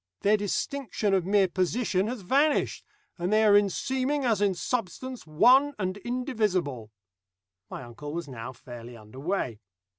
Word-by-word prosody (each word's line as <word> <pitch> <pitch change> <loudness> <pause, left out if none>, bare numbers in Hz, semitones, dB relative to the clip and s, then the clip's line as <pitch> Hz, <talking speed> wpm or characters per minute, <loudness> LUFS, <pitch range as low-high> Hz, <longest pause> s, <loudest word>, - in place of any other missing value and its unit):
Their 205 +2 +4
distinction 210 0 -2
of 185 -2 +1
mere 200 -1 +4
position 190 +2 0
has 240 -1 -4
vanished, 280 +10 +1 0.4
and 175 +3 -1
they 215 +1 +4
are 205 -1 +6
in 205 -1 +5
seeming 265 +7 -1
as 220 -4 +2
in 200 -2 +2
substance 250 +2 -4
one 255 - +5
and 185 -1 -2
indivisible." 205 - -2 0.8
My - - -7
uncle 130 +5 -8
was 170 0 -4
now 125 -2 -7
fairly 120 -1 -10
under 110 +4 -13
way. 140 - -2
200 Hz, 150 wpm, -27 LUFS, 155-245 Hz, 0.8 s, are